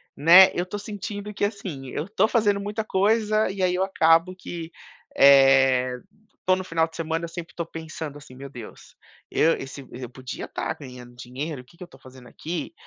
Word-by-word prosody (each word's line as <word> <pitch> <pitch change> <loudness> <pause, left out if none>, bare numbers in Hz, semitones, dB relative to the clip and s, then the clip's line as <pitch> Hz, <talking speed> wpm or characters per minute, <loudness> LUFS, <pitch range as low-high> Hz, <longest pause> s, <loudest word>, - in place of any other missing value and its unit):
né, 175 +6 +8
eu 175 - -2
tô 205 +3 -6
sentindo 205 0 -6
que, 205 - -4
assim, 175 - -6
eu 150 +8 -4
tô 215 +1 +2
fazendo 210 -4 +2
muita 210 +2 -3
coisa 215 +1 +1
e 195 -1 -5
aí 180 -1 +2
eu 185 - +1
acabo 165 -1 +3
que, 170 -2 -8 0.4
eh, 135 -2 +5 0.5
tô 185 0 +4
no 185 - -4
final 165 -2 0
de 160 - -17
semana, 165 0 -3
sempre 170 0 -9
tô 170 - -3
pensando 160 -2 -7
assim: 130 -3 -14
"Meu 140 +1 -9
deus, 120 -5 -12 0.4
eu 165 +1 +3
esse 135 0 -8
eu 125 -1 -8
podia 130 0 -8
tá - - -4
ganhando 125 -3 -12
dinheiro, 130 +3 -6
que 170 - -22
que 180 - -9
eu - - -8
estou 135 -6 -19
fazendo 130 -2 -15
aqui?" 170 - -6
165 Hz, 190 wpm, -24 LUFS, 135-190 Hz, 0.5 s, né